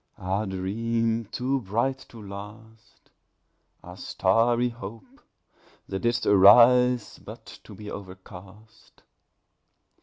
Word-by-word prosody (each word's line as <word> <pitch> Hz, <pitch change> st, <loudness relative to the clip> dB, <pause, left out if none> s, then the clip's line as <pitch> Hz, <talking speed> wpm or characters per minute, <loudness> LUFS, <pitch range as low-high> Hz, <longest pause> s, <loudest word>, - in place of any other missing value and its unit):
Ah, 95 Hz, +4 st, -2 dB
Dream 115 Hz, +4 st, -2 dB
too 130 Hz, +5 st, -2 dB
bright 120 Hz, +6 st, -2 dB
to 115 Hz, -, -13 dB
last! 105 Hz, +2 st, -13 dB, 0.7 s
Ah 90 Hz, -, -11 dB
starry 115 Hz, +7 st, +1 dB
Hope! 115 Hz, -2 st, -11 dB, 0.7 s
that 95 Hz, -, -4 dB
didst 120 Hz, +2 st, -1 dB
arise 120 Hz, +4 st, +5 dB
But -, -, -12 dB, 0.2 s
to -, -, -12 dB
be 105 Hz, -1 st, -9 dB
overcast! 100 Hz, +3 st, -13 dB
110 Hz, 95 wpm, -25 LUFS, 100-120 Hz, 0.7 s, arise